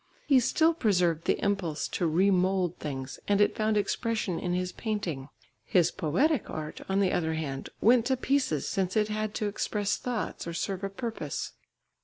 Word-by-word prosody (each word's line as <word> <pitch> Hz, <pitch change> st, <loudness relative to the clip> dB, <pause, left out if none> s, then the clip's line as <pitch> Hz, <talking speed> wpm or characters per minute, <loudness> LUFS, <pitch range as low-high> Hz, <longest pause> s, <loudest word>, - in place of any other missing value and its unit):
He 275 Hz, -3 st, +5 dB
still 320 Hz, +7 st, +3 dB
preserved 180 Hz, -, +1 dB
the -, -, +2 dB
impulse 190 Hz, -7 st, 0 dB
to 175 Hz, -, 0 dB
re 185 Hz, +5 st, +3 dB
mould 185 Hz, -1 st, +1 dB
things 135 Hz, -3 st, -5 dB
and 205 Hz, 0 st, +3 dB
it 205 Hz, -, +3 dB
found 215 Hz, 0 st, +1 dB
expression 215 Hz, -3 st, -1 dB
in 180 Hz, -, -2 dB
his 180 Hz, 0 st, -1 dB
painting. 180 Hz, -, -3 dB, 0.3 s
His 170 Hz, +7 st, +3 dB
poetic 260 Hz, -, +1 dB
art, 155 Hz, -1 st, -5 dB
on 195 Hz, +1 st, +2 dB
the 190 Hz, -, +2 dB
other 160 Hz, -2 st, 0 dB
hand, 140 Hz, -4 st, -4 dB
went 235 Hz, +1 st, +5 dB
to 260 Hz, -1 st, +2 dB
pieces 255 Hz, -, 0 dB
since 190 Hz, +1 st, -1 dB
it 210 Hz, 0 st, +2 dB
had 215 Hz, 0 st, -2 dB
to 215 Hz, -, -1 dB
express 205 Hz, 0 st, -1 dB
thoughts 240 Hz, -7 st, -3 dB
or 170 Hz, -, -4 dB
serve 190 Hz, +2 st, -3 dB
a 195 Hz, -, -1 dB
purpose. 225 Hz, +3 st, -4 dB
195 Hz, 180 wpm, -29 LUFS, 170-215 Hz, 0.3 s, He